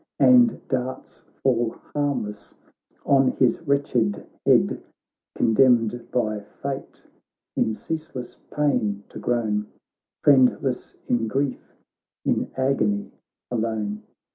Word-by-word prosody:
And 245 -3 +5
darts 130 0 -4 0.2
fall 120 -3 +2 0.2
harmless 140 -8 -2 0.5
on 135 -2 +4
his 125 -3 +2
wretched 125 -7 +1 0.2
head; - - +4 0.5
Condemned 120 0 +3
by 110 -4 0
fate 135 +6 -7 0.5
in 110 - +1
ceaseless 155 -4 -6
pain 105 -9 0
to - - -9
groan, 110 -4 0 0.6
Friendless 130 -2 +3
in 115 -2 +1
grief, 135 +4 -2 0.5
in - - +1
agony 140 +11 +1 0.4
alone. 110 -3 -2
125 Hz, 90 wpm, -24 LUFS, 110-140 Hz, 0.6 s, And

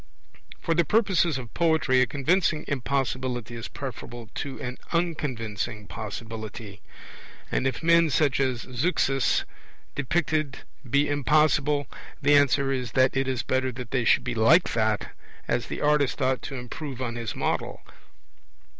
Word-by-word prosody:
For 165 - 0
the 170 +1 +3
purposes 180 - +2
of 120 -4 -8
poetry 160 -6 +3
a 125 - +3
convincing 155 +4 +1
impossibility 130 -3 -2
is 115 - -5
preferable 120 -3 -8
to 140 -2 -5
an 125 0 -5
unconvincing 120 - -2
possibility; 110 0 -7 0.7
and 130 - +1
if 130 +3 -3
men 170 0 +5
such 145 -2 +2
as 130 -3 0
Zeuxis 135 0 +1 0.5
depicted 155 0 -1 0.3
be 140 +3 +3
impossible, 145 0 +2 0.3
the 145 0 +3
answer 140 -1 +4
is 125 -4 -2
that 130 0 +3
it 135 0 +1
is 130 -2 -1
better 130 0 0
they 125 +1 -2
should - - +4
be - - -2
like 145 +11 +4
that, 110 -2 0 0.4
as 120 -1 0
the - - -5
artist 150 -2 +2
ought 130 -1 +1
to 135 - -6
improve 130 +2 -6
on 125 -3 -3
his 115 -2 -4
model. - - -2
130 Hz, 140 wpm, -26 LUFS, 120-150 Hz, 0.7 s, men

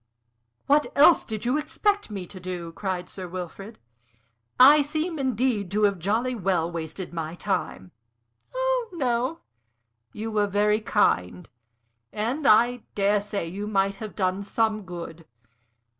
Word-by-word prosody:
"What 290 +2 +3
else 305 +4 +6
did 220 0 -5
you 255 +5 +1
expect 410 - -1
me 195 -3 -5
to 185 +2 -11
do?" 180 -2 -6
cried 180 0 -4
Sir 185 -2 -7
Wilfrid. 185 +4 -8 0.8
"I 290 +4 +9
seem, 310 +3 -2
indeed, 250 -6 0
to 210 +3 0
have 200 -3 +2
jolly 225 +8 0
well 180 -6 0
wasted 170 +2 -6
my 165 0 -4
time." 95 - -3 0.6
"Oh - - -1
no. 260 +1 -1 0.7
You 220 +1 -5
were 210 -1 +1
very 210 +1 +2
kind. 90 - +1 0.6
And 250 +8 -1
I 240 +3 +5
dare 205 0 +2
say 205 -4 -4
you 200 +5 -5
might 195 -1 0
have 215 -2 -8
done 185 0 0
some 215 0 -1
good. 170 -2 -8
210 Hz, 140 wpm, -25 LUFS, 185-250 Hz, 0.8 s, I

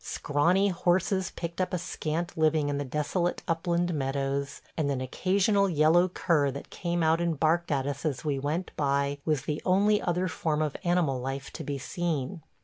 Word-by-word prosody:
Scrawny 175 +8 +2
horses 185 +1 +1
picked 170 +1 -5
up 185 0 -1
a - - +1
scant 170 0 -3
living 155 -2 +2
in 145 0 -1
the - - -1
desolate 150 +6 -1
upland 170 +1 0
meadows; 140 0 -2 0.2
and 150 -3 0
an 135 -2 0
occasional 195 - +2
yellow 165 +2 +4
cur 165 -5 +1
that 140 +1 -7
came 175 -1 -1
out 160 +1 +3
and 170 -4 -1
barked 165 +1 +2
at 135 -2 +1
us 140 0 -4
as 150 -3 -2
we 140 -2 0
went 155 +6 -2
by 140 0 0
was 150 -5 +1
the 150 +1 -3
only 205 +3 +3
other 180 +1 0
form 155 -2 -1
of 150 -2 -2
animal 175 -7 +1
life 135 +1 -4
to - - -6
be 140 -1 -3
seen. 160 +1 -3
160 Hz, 185 wpm, -28 LUFS, 140-175 Hz, 0.2 s, yellow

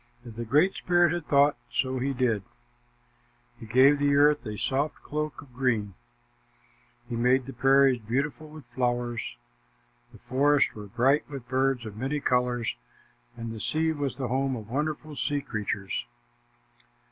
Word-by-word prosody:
As 115 - -9
the 115 +1 -5
Great 150 - +3
Spirit 175 -2 +2
had 175 -3 -4
thought, 140 +1 +4
so 130 -1 -1
he 135 +2 0
did. 120 -5 0 1.2
He 115 - -10
gave 130 +6 +5
the 145 0 +3
earth 145 +1 +4
a 105 -1 -5
soft 140 +6 -1
cloak 150 -1 -4
of 130 -4 -20
green. 120 -6 0 1.1
He 120 - -4
made 125 +2 +2
the 135 - -8
prairies 135 0 +4
beautiful 140 +7 -2
with 155 -3 -12
flowers. 120 - -2 0.7
The - - -14
forests 140 +2 +2
were 105 -1 -9
bright 130 +9 +2
with 135 -4 -8
birds 130 -1 0
of 105 -1 -8
many 135 +5 -2
colors, 125 - 0 0.6
and 115 -1 -5
the 110 - -7
sea 160 +7 0
was 145 -3 -3
the 130 -3 -3
home 135 +1 0
of 110 -2 -9
wonderful 150 +2 -3
sea 145 0 -1
creatures. 105 - -3
130 Hz, 155 wpm, -27 LUFS, 120-145 Hz, 1.2 s, gave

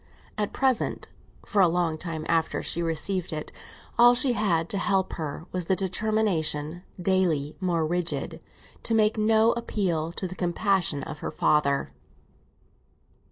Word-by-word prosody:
At 210 -1 -2
present, 260 -3 0 0.4
for 205 - +2
a 185 - +6
long 170 -1 0
time 160 -3 -5
after 165 -1 0
she 170 - 0
received 170 +3 -1
it, 155 -1 -5 0.5
all 240 +1 +8
she 250 0 +2
had 175 -7 +1
to 200 - -1
help 190 -1 +1
her 155 0 -5
was 180 -2 -3
the 190 - +3
determination, 185 -5 0 0.2
daily 175 -6 +1
more 175 -4 0
rigid, 175 +1 -2 0.4
to 225 - 0
make 215 -1 +3
no 220 +1 +4
appeal 180 -9 -1
to 185 - -2
the 180 - -7
compassion 175 -4 0
of 150 +1 -7
her - - -4
father. 140 -2 +1
180 Hz, 145 wpm, -26 LUFS, 160-210 Hz, 0.5 s, all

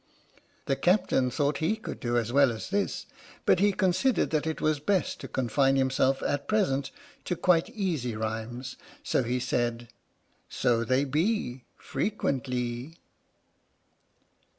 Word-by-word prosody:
The 135 - +1
captain 175 -7 +2
thought 140 +2 0
he 165 +7 +1
could 220 - -7
do 120 0 0
as 120 0 -1
well 140 -2 +5
as 115 +10 -7
this, 200 0 -1 0.4
but - - +4
he 205 +1 +4
considered 190 +7 +1
that 155 0 0
it 160 - -2
was 155 -1 +1
best 185 +5 0
to - - -7
confine 135 +2 +1
himself 135 0 +2
at 145 0 -1
present 140 -11 +1 0.4
to 180 - -1
quite 170 +1 +3
easy 170 - -2
rhymes, 115 +4 -4 0.3
so - - +1
he 125 +1 -1
said: 120 -1 -1 0.6
So 115 -1 +1
they 130 +4 +2
be 145 - -1
Frequentlee. 130 - -2
135 Hz, 135 wpm, -28 LUFS, 125-175 Hz, 0.6 s, well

